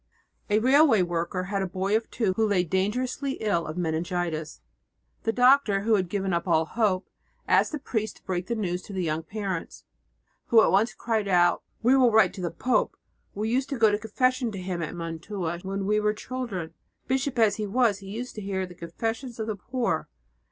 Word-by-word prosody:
A 205 - +3
railway 260 -2 +5
worker 175 +1 -2
had 195 +2 -2
a 190 - -1
boy 190 +3 -1
of 225 +1 -1
two 215 -6 0
who 220 +3 +1
lay 195 -4 +2
dangerously 245 - -1
ill 200 -9 -1
of 155 +2 -6
meningitis. 165 - -2 0.6
The 225 - 0
doctor, 250 -4 +4
who 220 +2 +2
had 185 -4 +2
given 195 -1 -1
up 170 +1 -1
all 160 -2 +3
hope, 200 -1 0 0.4
asked - - +3
the 305 - -2
priest 220 -6 -3
to - - -24
break 180 -1 -3
the 235 - -1
news 180 -5 -2
to 200 - -10
the 185 -1 -1
young 160 -1 -1
parents, 190 0 -5 0.6
who 230 - +6
at - - +3
once 205 +5 +2
cried 220 -3 -1
out, 175 -2 +3 0.2
"We 250 +3 +5
will 255 -2 +5
write 215 -5 +5
to 195 - -7
the 175 - -1
pope! 250 +10 0 0.4
We 215 +2 -2
used 260 +3 0
to 275 - -2
go 220 -2 +5
to 205 - 0
confession 250 +2 0
to - - -5
him 180 -2 -4
at 165 - -4
Mantua 170 +1 -4
when 195 +1 -3
we 210 +1 +2
were 210 0 +1
children; 215 -9 -5 0.3
bishop 265 0 -1
as 220 -3 +3
he 210 -1 -2
was, 220 -2 +2
he 195 - -11
used 230 +5 -5
to 215 - -7
hear 190 -1 -2
the 180 - -11
confessions 225 +9 -5
of 220 - -1
the 215 -1 -3
poor." 245 +5 -2
200 Hz, 210 wpm, -26 LUFS, 180-230 Hz, 0.6 s, who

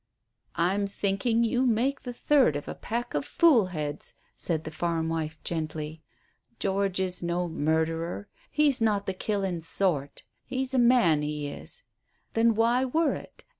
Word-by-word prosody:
"I'm 195 +4 +1
thinking 200 +4 +1
you 245 +2 +1
make 255 +3 +1
the 245 - -5
third 255 - +3
of 145 - -4
a - - -4
pack 235 +2 -4
of 145 - 0
fool 240 - +4
heads," 150 -5 -5 0.2
said 160 -3 -2
the 155 - -6
farm 165 0 -1
wife 160 -1 -3
gently. 155 -1 -3 0.6
"George 195 -1 0
is 185 -1 -1
no 175 +1 -1
murderer, 160 +4 -1 0.2
he's 290 -4 +3
not 210 -3 +2
the 190 - -1
killin' 190 -3 -2
sort. 160 -4 0 0.2
He's 260 0 -3
a 260 - +3
man, 235 -11 +5
he 150 0 -3
is. - - -7 0.5
Then 225 0 +3
why 235 +3 +3
worrit? 310 +4 -1
190 Hz, 150 wpm, -28 LUFS, 160-235 Hz, 0.6 s, man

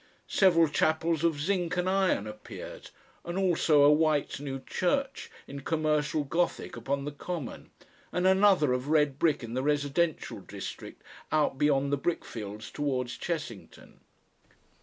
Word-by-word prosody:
Several 170 -4 +4
chapels 160 +2 +1
of 165 -3 +1
zinc 175 +1 -1
and 180 0 0
iron 190 - +2
appeared, 105 0 -9 0.3
and 175 +2 -4
also 165 -6 +3
a 145 - +7
white 150 -2 +2
new 135 -2 -5
church 270 - -1 0.2
in 140 - -8
commercial 150 0 0
Gothic 170 +5 -1
upon 140 +4 -2
the 145 - -3
common, 150 -1 -6 0.4
and 180 +2 0
another 190 -7 +5
of 125 +2 -2
red 150 -3 +2
brick 155 -6 +2
in 115 0 -6
the 130 - 0
residential 145 +3 0
district - - -8 0.3
out 150 -3 +1
beyond 140 -1 +2
the 140 - +1
brickfields 110 -9 -4
towards 130 -4 -2
Chessington. 150 - -6
150 Hz, 140 wpm, -29 LUFS, 140-170 Hz, 0.4 s, a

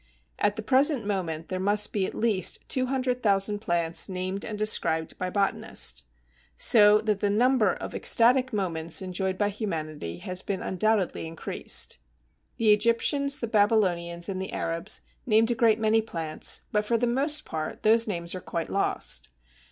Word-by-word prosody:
At 205 - +1
the 220 - -6
present 265 0 +3
moment 170 -6 -3
there 185 - -3
must 205 +2 +1
be 195 -3 0
at - - -8
least 215 -5 0
200,000 250 -6 0
plants 170 -4 +1
named 185 +1 -3
and 210 - -6
described 165 -7 +1
by 185 - -2
botanists. 180 - -1 0.5
So 210 -2 +6
that 210 -2 -1
the 205 - 0
number 230 -1 +3
of - - -7
ecstatic 255 +2 +3
moments 170 -5 -1
enjoyed 185 0 -2
by 205 0 +1
humanity 155 - -5
has 185 0 -6
been 195 -2 -4
undoubtedly 190 -3 -1
increased. 160 - -2 0.6
The 220 -2 +4
Egyptians, 275 +7 +1
the - - 0
Babylonians, 185 -6 +1
and 190 -2 -4
the 190 - -6
Arabs 165 +4 -1 0.3
named 225 +1 +3
a - - +3
great 225 -2 +3
many 220 0 +2
plants, 165 -7 -3
but 210 0 +1
for 230 +2 0
the 245 - 0
most 285 +5 +1
part 155 -1 -6
those 225 +2 +4
names 170 -4 -2
are 185 - -6
quite 165 -1 -5
lost. 195 - -1
205 Hz, 160 wpm, -26 LUFS, 180-225 Hz, 0.6 s, So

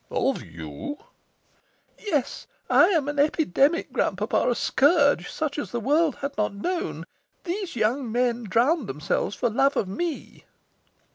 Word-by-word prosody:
"Of - - 0
you?" 80 - -7 1.0
"Yes. 300 - -2 0.2
I - - +7
am 330 -7 +1
an 290 0 -2
epidemic, 300 - +2
grand - - 0
papa, - - 0
a 245 - +1
scourge, 285 - +3
such 305 -2 -3
as - - -4
the 240 - -3
world 295 +5 +2
has 280 0 -2
not 210 -1 0
known. 350 - -3 0.4
Those 375 -2 -4
young 235 +2 0
men 240 0 0
drowned 240 - +2
themselves 150 +7 -2
for 240 - 0
love 275 +5 +2
of 195 - 0
me." 315 - -5
275 Hz, 145 wpm, -25 LUFS, 220-315 Hz, 1.0 s, I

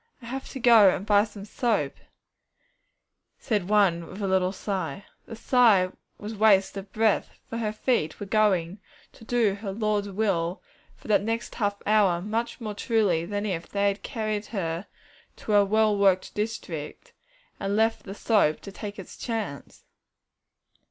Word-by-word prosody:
'I - - -9
have 265 +3 -6
to 265 - -7
go 230 -5 +7
and 185 - -2
buy 205 -1 +5
some 205 -2 -10
soap,' 210 - -1 1.4
said 205 -6 -2
one 190 -5 +3
with 190 - -10
a - - 0
little 190 -1 +2
sigh. 190 -3 -4 0.2
The 225 - -7
sigh 225 -6 +4 0.3
was 210 +2 -7
waste 205 -3 +3
of 195 0 -8
breath, 220 -1 +1 0.2
for 230 - -5
her 215 -2 -1
feet 215 -7 -1
were 205 - -5
going 195 -3 +1 0.3
to - - -16
do 225 -3 +1
her 200 0 -5
Lord's 210 -1 -1
will 190 -3 -1 0.4
for - - -16
that 205 -2 +3
next 225 +2 -3
half 205 -3 -1
hour 205 -5 +3
much 220 +7 -3
more 215 -3 -5
truly 205 -6 +1
than 205 +2 -3
if 175 -5 -3
they 200 0 +1
had 200 +1 -4
carried 215 -3 -3
her 170 -3 -3 0.5
to - - -6
her 205 -1 +6
well 215 +1 +2
worked 195 -2 +2
district, 195 -8 -5 0.5
and 195 0 -1
left 225 +1 +2
the 195 -1 -9
soap 205 -9 +2
to 200 - -9
take 205 +1 -7
its 195 - -10
chance. 215 - -5
205 Hz, 165 wpm, -26 LUFS, 190-220 Hz, 1.4 s, go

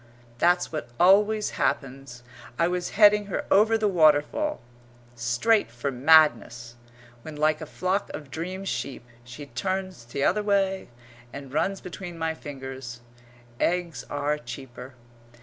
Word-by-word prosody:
That's 175 +1 +2
what 155 -7 -5
always 210 +4 +4
happens! 135 -3 -2 0.3
I 170 - +3
was 180 0 -2
heading 210 -1 +6
her 195 - -3
over 220 +3 +5
the 215 -1 +1
waterfall, 170 - +2 0.5
straight 120 - +1
for 120 +4 -4
madness, 130 -4 +3 0.5
when, 155 +4 -9
like 155 +1 +1
a 155 - -6
flock 185 +5 -2
of 145 -3 -9
dream 185 +4 -5
sheep, 140 -9 -4 0.2
she 125 +4 -10
turns 185 +5 -4
t'other 140 - 0
way 195 -2 0 0.4
and 140 -1 -9
runs 195 +5 -1
between 180 -1 -8
my 160 0 -1
fingers. 130 -5 -8 0.6
Eggs 170 -7 -1
are 145 +1 -1
cheaper. 125 0 -10
155 Hz, 130 wpm, -26 LUFS, 135-190 Hz, 0.6 s, heading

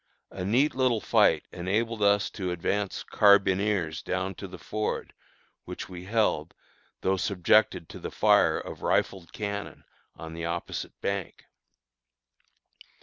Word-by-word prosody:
A 95 - -5
neat 125 +10 +2
little 130 -3 +2
fight - - +3
enabled 110 +5 -1
us 100 -1 +3
to 95 -4 -4
advance 95 +3 -2
carbineers 100 -4 +3
down 95 +1 -2
to 95 - -8
the 95 - -10
ford, 110 0 -3 0.5
which - - -7
we 90 -1 -8
held, 100 -7 0 0.5
though 95 0 +1
subjected 90 -2 +2
to - - -9
the - - -5
fire - - +4
of - - -7
rifled 95 -4 0
cannon 100 -3 -5 0.3
on 80 0 -9
the 85 0 -5
opposite 85 +1 -4
bank. 100 -2 -3
100 Hz, 130 wpm, -27 LUFS, 90-105 Hz, 0.5 s, fire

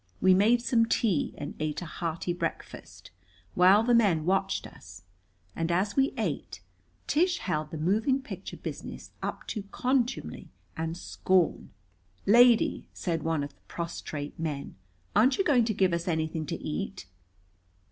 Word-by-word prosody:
We 185 0 +5
made 225 +6 +4
some 230 -3 +3
tea 205 -9 +1
and 145 - -5
ate 155 -1 -2
a 175 - -6
hearty 170 +2 -3
breakfast, 90 - -6 0.4
while 190 +4 +6
the 245 +1 +2
men 195 -10 +3
watched 195 +1 0
us. 95 -10 -13 0.5
And 165 +1 -1
as 190 +4 0
we 270 +1 +3
ate, - - -3 0.5
Tish 355 +3 +2
held 155 - -2
the 160 - -6
moving 215 - +1
picture 200 -8 -8
business - - -7
up - - -4
to 215 - -3
contumely 255 +1 -1 0.3
and 165 +1 -3
scorn. 185 -1 0 0.6
"Lady," 235 +2 +5
said 165 -3 -2
one 160 -1 0
of 145 - -7
the - - -34
prostrate 155 -3 -5
men, 150 -4 -4 0.4
"aren't 255 +5 +4
you 390 - +2
going 255 -9 +4
to 220 - 0
give 190 -2 +2
us 170 +1 -2
anything 160 -2 -1
to - - -2
eat?" 195 - -4
185 Hz, 150 wpm, -28 LUFS, 160-230 Hz, 0.6 s, while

